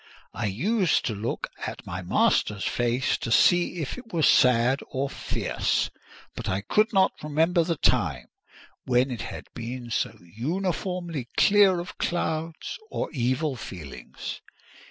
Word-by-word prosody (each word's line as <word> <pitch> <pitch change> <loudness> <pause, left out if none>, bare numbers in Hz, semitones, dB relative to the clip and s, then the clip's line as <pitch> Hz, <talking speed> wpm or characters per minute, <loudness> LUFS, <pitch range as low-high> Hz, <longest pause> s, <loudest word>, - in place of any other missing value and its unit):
I 110 - -2
used 185 - +1
to 115 - 0
look 110 +3 -3 0.2
at - - -7
my 90 +1 -5
master's 100 +3 +2
face 120 +1 0
to 115 - -4
see 175 +8 +4
if 145 - -5
it 235 -3 -14
were 165 -4 0
sad 125 0 +5
or 135 +1 -2
fierce; - - -1 0.4
but - - -4
I 95 +1 0
could 215 - +2
not 190 -3 +4
remember 160 +4 +2
the 165 0 -1
time - - +1 0.6
when 125 +1 +2
it 120 - -4
had - - -7
been 120 0 -6
so - - -1
uniformly 170 - -3
clear 200 -3 +5
of 175 - -8
clouds 165 - -2
or - - -3
evil 130 +2 0
feelings. 75 - -8
140 Hz, 140 wpm, -26 LUFS, 115-175 Hz, 0.6 s, sad